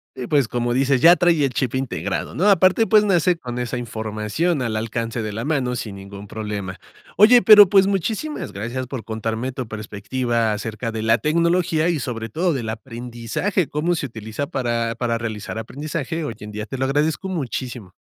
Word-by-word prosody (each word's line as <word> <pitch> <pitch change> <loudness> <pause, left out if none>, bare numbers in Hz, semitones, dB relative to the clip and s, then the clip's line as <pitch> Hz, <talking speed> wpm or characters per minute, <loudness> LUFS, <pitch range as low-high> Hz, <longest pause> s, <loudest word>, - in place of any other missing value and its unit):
Y, 125 - -5
pues, 140 -6 +2
como 120 0 -1
dices, 135 0 +2
ya 170 +4 +8
trae 170 -5 +3
el 130 - -2
chip 130 0 -1
integrado, 130 -2 -3
¿no? 190 +8 +3
Aparte, 190 +4 +4
pues, 215 -1 +5
nace 180 -2 +3
con 125 -5 -6
esa 125 0 -3
información 110 +7 -2
al 115 -3 -2
alcance 115 +1 -3
de 110 -1 -4
la 115 +5 -4
mano 130 -5 0
sin 105 -4 -5
ningún 100 +1 -10
problema. 105 -3 -5 0.4
Oye, 230 +5 +7
pero, 205 -4 +9
pues, 195 -1 +5
muchísimas 215 - -2
gracias 120 +5 -4
por 130 -4 -6
contarme 110 +3 -3
tu 125 -3 -5
perspectiva 110 +2 -2
acerca 110 +2 -4
de 110 -1 -4
la 115 +1 +3
tecnología 170 +2 +1
y, 165 -4 +1
sobre 115 -3 -4
todo, 170 - 0
del 120 -5 -3
aprendizaje, 120 - -3
cómo 165 +4 0
se 150 - -3
utiliza 110 +4 -5
para 120 -5 -1
para 115 -2 -1
realizar 110 -1 -5
aprendizaje 150 +7 -4
hoy 115 -7 -5
en 105 0 -8
día. 105 0 -5
Te 135 - -6
lo 130 - -1
agradezco 150 +7 0
muchísimo. 125 - -4
125 Hz, 185 wpm, -21 LUFS, 110-160 Hz, 0.4 s, pero